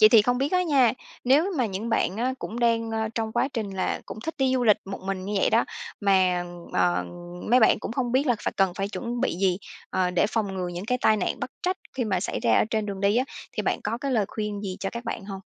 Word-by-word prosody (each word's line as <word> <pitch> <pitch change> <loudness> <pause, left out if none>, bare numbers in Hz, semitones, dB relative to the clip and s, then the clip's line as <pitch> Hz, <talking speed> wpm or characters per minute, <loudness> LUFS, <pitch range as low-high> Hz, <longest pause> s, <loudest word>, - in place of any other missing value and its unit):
Vậy 215 - +10
thì 220 -2 +7
không 245 +2 +1
biết 275 +5 0
á 365 0 +4
nha, 270 -9 +4 0.3
nếu 300 +10 +4
mà 245 - +3
những 205 +3 -4
bạn 195 -4 +1
á 255 +3 0
cũng 235 0 -5
đang, 230 -1 +2
a, 220 0 -1
trong 220 -1 -2
quá 265 - +1
trình 215 -5 -2
là 190 -1 -1
cũng - - -7
thích 320 +6 -4
đi 265 -1 +2
du 250 -1 +1
lịch 210 -3 +6
một 195 0 -6
mình 195 -1 -2
như 205 - -4
vậy - - +3
đó, - - +4 0.4
mà, 185 -3 +3 0.3
ờ, 90 0 +2 0.5
mấy 250 +1 +6
bạn 220 - +5
cũng - - -5
không 245 -1 -1
biết 270 +3 +3
là 245 -4 +3
phải - - -1
cần 195 -2 +3
phải 195 0 -2
chuẩn 240 +2 -4
bị 260 - 0
gì, 185 -1 +2 0.3
ờ, 180 -1 +1
để 180 +3 +2
phòng 210 -3 -1
ngừa 180 -1 -2
những 175 +2 -5
cái 250 +2 0
tai 215 - +4
nạn 200 - -2
bất - - -3
trách 370 +1 0 0.2
khi 250 - 0
mà 190 -5 0
xảy - - -2
ra 115 -1 +3
ở - - +4
trên 215 -1 0
đường 195 -1 -4
đi 200 +2 +3
á, 255 - +3 0.3
thì - - -2
bạn - - 0
có 225 +3 -1
cái 275 0 -2
lời 215 -4 +3
khuyên 210 -2 -3
gì 190 -3 -4
cho 195 - -2
các 235 +1 -6
bạn 225 -3 -4
hông? 195 -1 -6
220 Hz, 280 wpm, -26 LUFS, 195-245 Hz, 0.5 s, Vậy